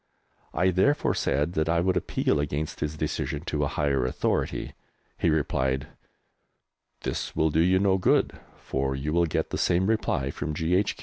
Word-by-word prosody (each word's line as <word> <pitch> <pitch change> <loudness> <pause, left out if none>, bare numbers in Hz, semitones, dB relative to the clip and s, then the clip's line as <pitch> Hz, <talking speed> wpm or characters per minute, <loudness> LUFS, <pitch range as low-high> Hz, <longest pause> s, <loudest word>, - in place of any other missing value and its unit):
I 95 +1 +3
therefore 140 - +2
said 75 +5 0
that 80 -1 0
I 85 0 +3
would 90 +2 +1
appeal - - 0
against 75 +1 -3
his 75 +1 -3
decision 75 0 -2
to 75 -3 -2
a - - +1
higher 70 -3 0
authority. 60 - -1 0.5
He - - +2
replied, 65 -2 0 1.1
"This - - -3
will 80 0 +2
do 80 - +1
you 90 +2 +4
no 95 0 +3
good, 90 - +3 0.2
for 65 0 -2
you 75 +3 -3
will 85 0 +3
get - - -2
the - - -2
same 90 +1 +2
reply 110 +2 0
from 75 +1 -4
G.H. 90 +6 +1
80 Hz, 170 wpm, -27 LUFS, 70-90 Hz, 1.1 s, you